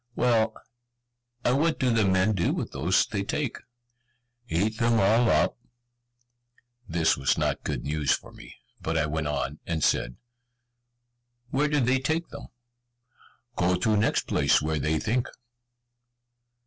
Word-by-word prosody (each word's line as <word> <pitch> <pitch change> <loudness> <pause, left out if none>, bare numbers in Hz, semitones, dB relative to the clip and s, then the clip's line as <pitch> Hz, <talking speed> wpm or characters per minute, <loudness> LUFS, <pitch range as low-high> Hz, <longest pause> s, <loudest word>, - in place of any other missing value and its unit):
"Well, 110 -2 +2 0.9
and 125 +3 +2
what 165 +1 +1
do 125 -2 +1
the 110 -2 +3
men 95 +3 +2
do 85 -3 0
with - - -4
those - - +2
they 100 - -3
take?" 130 +4 -3 0.9
"Eat 105 +6 0
them 115 0 +2
all 115 +3 +3
up." - - +2 1.3
This 80 -1 +2
was 65 - 0
not - - -1
good - - -3
news 75 -1 -1
for - - -2
me, - - -13 0.3
but 80 +1 -2
I 80 - +2
went 75 0 -2
on, 75 0 -3
and 80 -3 -2
said, - - +1 1.4
"Where 145 +3 +2
do 150 0 +1
they 130 +1 +2
take 160 +5 -1
them?" 140 - -9 1.1
"Go 90 +1 +2
to 105 +4 +1
next 105 - +1
place - - +3
where 80 0 -2
they 80 +3 0
think." 120 +7 -1
100 Hz, 145 wpm, -26 LUFS, 80-120 Hz, 1.4 s, the